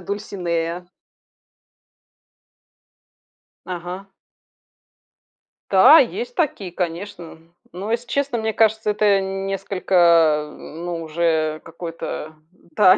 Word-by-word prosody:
Дульсинея. 175 Hz, -3 st, -3 dB, 2.8 s
Ага. 180 Hz, +2 st, -6 dB, 1.6 s
Да, -, -, +8 dB
есть 480 Hz, +2 st, -1 dB
такие, 265 Hz, -, -1 dB
конечно. 175 Hz, -1 st, -5 dB, 0.4 s
Но, 195 Hz, +5 st, -5 dB
если 240 Hz, +1 st, -2 dB
честно, 275 Hz, -1 st, -1 dB
мне 220 Hz, 0 st, -1 dB
кажется, 220 Hz, -1 st, +2 dB
это 210 Hz, +1 st, 0 dB
н 195 Hz, 0 st, -4 dB
несколько, 170 Hz, -6 st, +3 dB
э, -, -, -13 dB
ну 170 Hz, +1 st, -6 dB
уже 160 Hz, -1 st, 0 dB
какой-то, 165 Hz, -2 st, -7 dB, 0.4 s
да, 190 Hz, -2 st, +6 dB
180 Hz, 90 wpm, -21 LUFS, 165-205 Hz, 2.8 s, Да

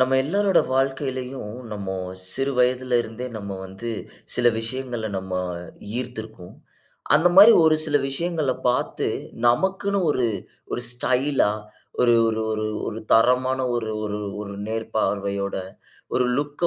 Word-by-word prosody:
நம்ம 130 Hz, +1 st, +3 dB
எல்லாரோட 195 Hz, +4 st, +3 dB, 0.2 s
வாழ்க்கையிலும், 130 Hz, -4 st, -2 dB, 0.2 s
நம்ம 100 Hz, -2 st, -4 dB, 0.4 s
சிறு 135 Hz, +4 st, 0 dB
வயதிலிருந்தே 125 Hz, -1 st, +1 dB
நம்ம 100 Hz, -2 st, -6 dB
வந்து 100 Hz, +5 st, -6 dB, 0.4 s
சில 120 Hz, -, +2 dB
விஷயங்ள்ல 120 Hz, -1 st, -3 dB
நம்ம 95 Hz, 0 st, -7 dB, 0.7 s
ஈர்த்துருக்கும். 110 Hz, -7 st, -7 dB, 0.6 s
அந்த 160 Hz, +4 st, +5 dB
மாரி 205 Hz, +4 st, +11 dB
ஒரு 155 Hz, -1 st, +5 dB
சில 150 Hz, -2 st, +2 dB
விஷயங்கள 155 Hz, -1 st, 0 dB, 0.2 s
பாத்து, 125 Hz, -, 0 dB, 0.4 s
நமக்குன்னு 190 Hz, +10 st, +2 dB
ஒரு 125 Hz, -4 st, +1 dB, 0.5 s
ஒரு 120 Hz, -, -2 dB
ஸ்டைலா, 130 Hz, 0 st, +1 dB, 0.5 s
ஒரு 120 Hz, -1 st, +5 dB
ஒரு 110 Hz, 0 st, -1 dB
ஒரு 110 Hz, 0 st, -1 dB, 0.2 s
ஒரு 110 Hz, -, -5 dB
தரமான 125 Hz, +3 st, +4 dB, 0.2 s
ஒரு 110 Hz, -2 st, -2 dB
ஒரு 105 Hz, 0 st, -3 dB, 0.2 s
ஒரு 100 Hz, -1 st, -7 dB
நேர்பார்வையோட 100 Hz, -3 st, -1 dB, 0.6 s
ஒரு 125 Hz, -, +3 dB
லுக்‌ 145 Hz, +3 st, -2 dB
125 Hz, 120 wpm, -24 LUFS, 110-135 Hz, 0.7 s, மாரி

